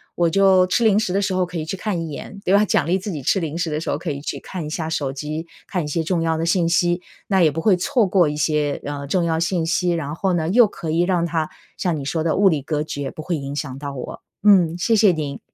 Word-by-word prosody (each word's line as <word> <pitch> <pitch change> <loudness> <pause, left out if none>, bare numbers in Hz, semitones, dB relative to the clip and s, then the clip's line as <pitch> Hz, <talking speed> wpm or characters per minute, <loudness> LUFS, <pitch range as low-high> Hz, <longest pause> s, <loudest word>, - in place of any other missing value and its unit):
我 170 -1 +2
就 190 0 +4
吃 235 +6 +1
零 210 -2 +4
食 200 -5 -1
的 200 - +1
时 195 -1 -1
候 185 0 +1
可 180 0 -7
以 160 - -2
去 160 +5 -4
看 185 -3 -2
一 165 - -5
眼， 155 +7 -8
对 185 - +1
吧， 205 +1 +5
奖 - - +1
励 180 +3 +1
自 200 +2 -5
己 150 - -5
吃 195 - +1
零 165 -2 -4
食 170 -2 -2
的 150 - -1
时 160 - -5
候 - - 0
可 170 - -4
以 140 - -5
去 145 - -5
看 180 -4 -6
一 - - -5
下 160 0 -3
手 140 -4 -2
机， 155 +4 -5 0.2
看 180 - -1
一 - - -5
些 160 +2 -1
重 170 +1 0
要 165 0 +1
的 165 - -1
信 170 0 +2
息， 175 +1 +2 0.3
那 190 -2 +2
也 165 - +5
不 160 +3 -4
会 185 +1 +4
错 245 +4 +2
过 185 -3 +3
一 150 - -2
些， 150 -1 0
呃， 140 -1 -5
重 175 +5 +1
要 165 -1 0
信 170 0 0
息， 175 +2 +1
然 160 -4 -2
后 190 +2 0
呢 165 -2 0
又 230 +4 +6
可 165 -5 -6
以 165 +2 +2
让 175 -2 +1
它 165 -2 -1 0.3
像 175 -4 -1
你 140 - -5
说 155 +3 -2
的 165 - +1
物 200 0 +5
理 155 -5 0
隔 150 +1 -2
绝， 145 -3 -4
不 - - -8
会 170 +1 -2
影 140 0 -5
响 135 -3 -4
到 140 -1 -5
我。 125 - -7 0.2
嗯， 180 -5 +5
谢 225 +6 +2
谢 210 -2 +6
您！ 145 -4 -4
170 Hz, 315 characters per minute, -21 LUFS, 155-185 Hz, 0.3 s, 又